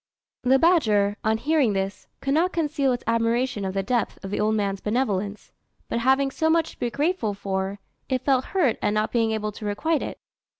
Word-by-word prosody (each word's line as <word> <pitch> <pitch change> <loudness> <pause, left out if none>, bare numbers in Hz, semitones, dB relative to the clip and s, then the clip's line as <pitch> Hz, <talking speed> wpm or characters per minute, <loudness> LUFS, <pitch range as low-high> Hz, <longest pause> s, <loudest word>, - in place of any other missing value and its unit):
The 255 +2 +4
badger, 215 - +3
on 220 0 +2
hearing 285 -3 +2
this, 195 +1 -3
could 275 - 0
not 345 +5 +2
conceal 295 -5 0
its 245 - -2
admiration 230 0 +1
of 190 0 -3
the 195 - 0
depth 240 +3 -1
of 195 - -6
the - - -1
old 215 +1 +2
man's 200 -2 -1
benevolence; 210 -3 -2 0.4
but - - 0
having 265 +3 +3
so 320 +4 0
much 325 0 +2
to - - -19
be 240 - 0
grateful 285 - -1
for, 195 0 -3 0.3
it 260 -1 -1
felt 265 -2 +3
hurt 310 - +1
at 205 - +1
not 215 0 0
being 230 -2 +2
able 215 -1 -2
to 210 - -11
requite 285 +10 0
it. - - -5
230 Hz, 205 wpm, -24 LUFS, 205-275 Hz, 0.4 s, The